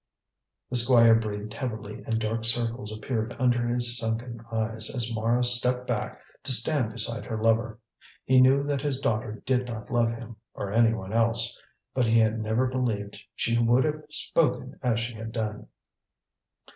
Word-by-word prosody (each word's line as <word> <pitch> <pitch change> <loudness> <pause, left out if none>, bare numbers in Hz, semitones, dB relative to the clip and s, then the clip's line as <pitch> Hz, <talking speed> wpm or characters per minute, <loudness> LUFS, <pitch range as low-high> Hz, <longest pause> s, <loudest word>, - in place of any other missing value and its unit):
The 125 - +2
Squire 120 -1 +6
breathed 105 -1 -2
heavily 110 -4 -6
and 115 -1 0
dark 115 +1 -2
circles 115 -1 +3
appeared 110 +1 -3
under 120 -2 +1
his 120 0 +1
sunken 115 +1 -4
eyes 110 -1 -2
as 120 -2 -3
Mara 115 +2 +1
stepped 125 +1 +3
back - - -3 0.2
to - - -2
stand 125 0 +1
beside 115 +1 -2
her 110 -2 -4
lover. 115 0 +1 0.5
He 130 0 +5
knew 135 +2 +5
that 145 -1 -2
his 140 -2 -1
daughter 110 -4 -2
did 125 -1 +1
not 110 -3 -7
love 120 -1 +2
him, 115 -1 -8 0.2
or 100 - -5
anyone 115 -3 +1
else, 115 +1 +3 0.4
but 125 -3 +1
he 115 +1 +3
had 110 0 +2
never 110 +4 0
believed 115 -6 -3
she 115 0 0
would 120 +2 +3
have 155 0 -2
spoken 145 -3 -1
as 120 -3 +1
she 120 +1 -4
had 110 0 -7
done. 105 -2 -4
115 Hz, 165 wpm, -26 LUFS, 110-125 Hz, 0.5 s, Squire